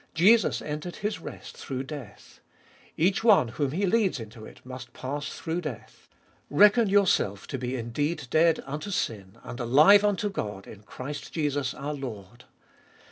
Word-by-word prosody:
Jesus 205 +6 +4
entered 155 +4 -5
His 210 -4 -3
rest - - -9
through 130 -1 -5
death; 135 -5 -10 0.6
each 185 +6 +2
one 220 - +5
whom 140 +3 -1
He 190 +7 0
leads 195 - +1
into 110 0 -10
it - - -14
must 130 -1 -9
pass 145 +3 -4
through 165 +2 -3
death. 120 -9 -9 0.2
" - - -35
Reckon 210 +6 +5
yourself 185 - +2
to 135 - -5
be 125 +1 -3
indeed 135 +6 -2
dead 165 0 +3
unto 150 +7 -5
sin, 100 - -3
and 120 - -8
alive 150 - +6
unto 205 0 +1
God 105 - -5
in 105 - -12
Christ 135 +7 -7
Jesus 145 -4 -1
our 145 +2 -4
Lord." 120 -5 -8
145 Hz, 160 wpm, -27 LUFS, 120-180 Hz, 0.6 s, alive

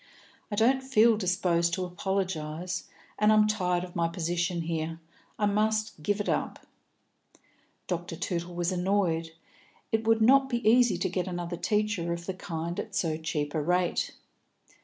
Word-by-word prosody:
"I 210 - -2
don't 250 +5 +3
feel 235 -4 +4
disposed 175 -4 +1
to 185 - -2
apologise, 180 -2 -3 0.3
and 210 0 +5
I - - +6
am 215 0 +6
tired 180 -4 0
of 180 -1 -9
my 170 0 +2
position 170 +1 -1
here. 165 0 -3 0.4
I 210 - +1
must 215 -2 0
give 205 +6 0
it 205 - -2
up." - - -2 1.2
Dr. 175 -2 -3
Tootle 170 +1 -3
was 175 +1 0
annoyed. 180 -3 0 0.6
It 225 0 0
would 225 -1 +4
not 270 +3 +5
be 240 -3 -1
easy 235 -4 +5
to 180 - 0
get 185 0 -2
another 175 -1 -4
teacher 205 -3 0
of 170 0 -6
the 190 - -3
kind 170 -1 -4
at - - -5
so 160 -3 0
cheap 155 -2 -3
a 155 - 0
rate. 180 +3 0
180 Hz, 160 wpm, -28 LUFS, 170-210 Hz, 1.2 s, I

